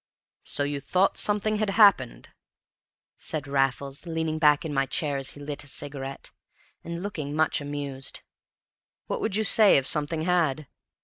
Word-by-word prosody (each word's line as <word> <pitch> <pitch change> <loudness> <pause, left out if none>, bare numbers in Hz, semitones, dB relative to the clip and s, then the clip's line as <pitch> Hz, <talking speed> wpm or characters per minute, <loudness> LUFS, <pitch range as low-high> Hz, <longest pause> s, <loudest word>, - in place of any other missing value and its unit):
"So 145 - +1
you 145 0 -3
thought 180 +8 +1
something 210 +1 +1
had 215 -1 -1
happened?" 195 - +3 0.9
said 150 -3 -1
Raffles, 140 +2 -1
leaning 160 -1 -2
back 150 0 +4
in 155 - -4
my 135 -1 0
chair 145 -1 -2
as 135 -1 -3
he - - -13
lit 145 0 -6
a - - -14
cigarette, 135 -1 -4 0.5
and 170 +1 -6
looking 150 -8 -5
much 155 -1 +1
amused. 140 -2 -4 0.8
"What - - -4
would 215 -3 -2
you 220 - +1
say 215 -3 +6
if 135 - 0
something 150 +3 +1
had? 160 -4 0
150 Hz, 160 wpm, -26 LUFS, 140-175 Hz, 0.9 s, say